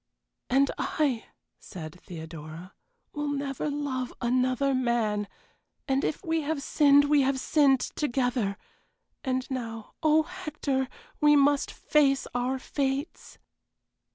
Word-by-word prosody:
"And 270 +2 +3
I," 275 -7 0 0.3
said 165 -2 -9
Theodora, 160 +1 -9 0.4
"will 295 0 -3
never 280 0 -2
love 280 -3 -2
another 255 +2 +1
man 235 -5 0 0.6
and 270 0 +1
if 310 - -2
we 325 -1 +1
have 295 -1 -2
sinned 285 -1 +5
we 290 0 +4
have 265 0 +1
sinned 275 -1 +3
together 245 -7 -1 0.7
and 260 -1 -1
now, 230 -4 -5
oh, 310 0 +4
Hector, 280 -4 -3 0.3
we 295 -1 +6
must 285 0 +3
face 280 -2 +2
our 250 +2 0
fates." 275 +3 -3
270 Hz, 115 wpm, -28 LUFS, 240-290 Hz, 0.7 s, we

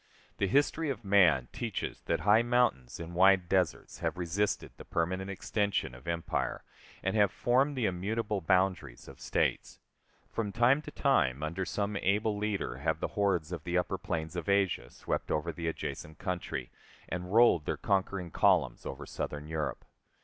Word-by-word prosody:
The 100 - +1
history 145 - +2
of 125 -5 -4
man 85 -10 +5
teaches 115 -6 -4
that - - +1
high 105 +2 +5
mountains 120 - +1
and 85 +1 -7
wide 95 0 +5
deserts 90 -3 0
have - - -2
resisted 90 +4 -1
the - - -9
permanent 95 +3 -2
extension 100 - -1
of 65 +4 -13
empire, 85 0 -2 0.4
and 95 +3 0
have 105 -2 +5
formed 135 +6 +2
the 120 - +1
immutable 105 +2 -1
boundaries 90 -7 0
of - - -12
states. - - -1 0.5
From 110 -3 -3
time 120 +7 +4
to 155 - -9
time, 75 - +1
under 85 +5 -2
some 100 +1 -2
able 105 +3 +1
leader, 105 -2 -2
have - - -1
the - - -2
hordes 95 -5 0
of 85 -4 -5
the 85 +2 0
upper 90 +1 -1
plains 85 -5 -3
of 85 +2 -3
Asia 95 -11 +1
swept - - -4
over 75 +3 0
the 85 +1 -5
adjacent 80 -1 -5
country, 90 -9 -4 0.4
and 90 +1 -5
rolled 110 -8 +5
their - - -1
conquering 95 -3 -1
columns - - +2
over 70 +1 -6
Southern 75 +2 -5
Europe. 80 -1 -3
95 Hz, 165 wpm, -31 LUFS, 85-105 Hz, 0.5 s, man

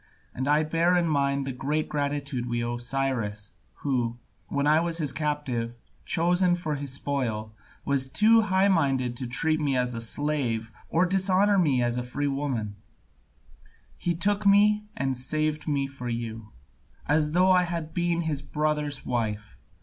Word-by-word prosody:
And 130 +2 -3
I 150 +2 +4
bear 165 +3 +2
in 170 -1 +2
mind 140 -2 +1
the 135 - -3
great 145 +4 -2
gratitude 140 -4 -2
we 120 0 -1
owe 120 0 -3
to - - -5
Cyrus, 120 -6 -2 0.3
who, 120 -4 0 0.3
when 140 0 -1
I 155 +2 +5
was 170 0 -1
his 150 -5 -1
captive, 140 -6 -2 0.3
chosen 175 +2 +2
for 165 -3 -3
his 140 -2 -3
spoil, 120 -6 -2 0.3
was 135 -2 0
too 225 +8 +5
high 195 -2 +2
minded 135 -9 +1
to 125 - -3
treat 155 +6 +2
me 140 -4 +1
as 125 0 0
a 115 - -4
slave, 115 -3 -1 0.2
or 165 +3 +3
dishonour 195 +2 +3
me 140 -8 +2
as 120 0 0
a - - -1
free 125 +4 -3
woman; 135 -8 -2 1.2
he 175 -1 -1
took 205 +5 0
me 210 +1 +4
and 135 -1 -1
saved 155 +4 -2
me 140 -2 +1
for 135 -3 -6
you, 115 -2 -5 0.5
as 150 +1 +2
though 185 +2 +4
I 180 -1 +5
had 165 -2 -4
been 175 -1 0
his 155 -4 -2
brother's 150 -1 -2
wife. 105 -4 -2
145 Hz, 165 wpm, -26 LUFS, 125-165 Hz, 1.2 s, I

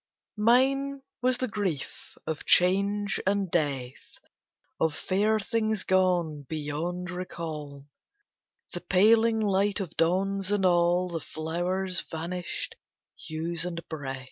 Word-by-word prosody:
Mine 270 +5 +3 0.2
was 255 0 +2
the 255 - -1
grief 200 - -4
of 160 -2 -3
Change 200 +2 +3
and 200 -2 +1
Death, 135 -6 -2 0.6
Of 160 -2 +1
fair 210 +3 +1
things 215 -1 0
gone 180 -5 +2
beyond 160 +4 -3
recall, 155 -6 -6 0.9
The - - -5
paling 220 +4 +4
light 200 -1 +2
of 180 -5 -5
dawns, 195 +3 +1
and 205 -2 +2
all 175 0 +3
The 170 -1 -3
flowers' 175 +4 -2
vanished 170 +2 -4 0.4
hues 165 +1 -4
and 170 -1 -5
breath. 140 -4 -4
180 Hz, 115 wpm, -28 LUFS, 165-205 Hz, 0.9 s, paling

